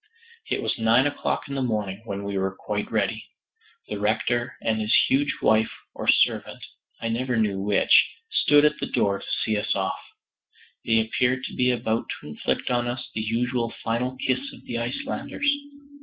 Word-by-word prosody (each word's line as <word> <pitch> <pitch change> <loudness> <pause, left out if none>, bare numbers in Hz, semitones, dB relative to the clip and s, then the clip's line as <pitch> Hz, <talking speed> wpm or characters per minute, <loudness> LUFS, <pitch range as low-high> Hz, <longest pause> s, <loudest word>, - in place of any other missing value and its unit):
It - - -1
was - - -1
nine 115 +4 +4
o'clock 145 - -1
in 140 - -6
the 135 - -1
morning 105 -5 -2
when 100 -2 -4
we 100 0 -3
were 95 0 -1
quite 105 +1 -4
ready. 110 0 0 0.6
The 105 - -4
rector 120 +4 0
and 110 -1 +1
his 105 0 -1 0.2
huge 140 +2 +2
wife 110 0 +4 0.2
or - - -6
servant, - - +2 0.3
I 115 - -3
never 120 +1 -1
knew 100 -3 +1
which, 100 0 +5 0.2
stood 145 - +5
at 150 0 +2
the - - -2
door 100 -1 +1
to - - -10 0.2
see 110 - 0
us 105 - 0
off. - - -1 0.8
They 115 -1 +3
appeared 125 +3 0
to - - -6
be 125 0 +2
about 115 -2 0
to - - -11
inflict 75 - -2
on 120 0 +1
us 120 +1 -5
the 110 - -2
usual 115 +1 -1
final 125 +3 -1
kiss 130 +1 0
of - - -14
the 115 - -4
Icelanders. 120 - -3
115 Hz, 180 wpm, -25 LUFS, 105-125 Hz, 0.8 s, which